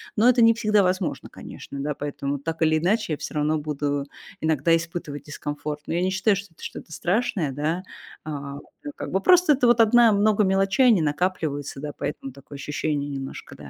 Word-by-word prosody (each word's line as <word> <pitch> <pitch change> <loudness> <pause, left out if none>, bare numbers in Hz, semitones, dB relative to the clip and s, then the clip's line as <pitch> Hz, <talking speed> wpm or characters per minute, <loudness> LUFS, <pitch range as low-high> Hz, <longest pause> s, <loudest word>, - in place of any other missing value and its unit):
но 225 +3 +4
это 250 -1 +4
не 230 0 +7
всегда 215 -2 +3
возможно, 185 -1 -1
конечно, 140 - -9
да. 150 +2 -2
Поэтому, 145 -1 -4
так 165 +4 -5
или 155 0 +3
иначе, 185 +1 +1
я - - -2
всё - - -7
равно 150 +1 +1
буду 145 -1 -2 0.4
иногда 160 +1 +3
испытывать 165 -4 -5
дискомфорт. 150 0 -5
Но - - -4
я 170 - 0
не 185 - +1
считаю, 190 +2 +2
что 200 +1 -6
это - - -16
что-то - - -8
страшное, 180 - 0
да. 155 +6 -2 0.4
А, 140 -2 -6 0.3
да, 290 - -5
как - - -6
бы 190 - +1
просто 360 - +6
это 255 -3 +2
вот 240 -1 +5
одна 230 +1 +6
много 210 +1 +3
мелочей, 195 +6 +3
они 220 -8 +5
накапливаются, 150 -3 -2
да, 150 +1 -5
поэтому 135 -2 -5
такое 140 +2 -13
ощущение 145 +1 -2
немножко, 135 -1 -7
да, 75 -1 -11
160 Hz, 195 wpm, -24 LUFS, 145-200 Hz, 0.4 s, не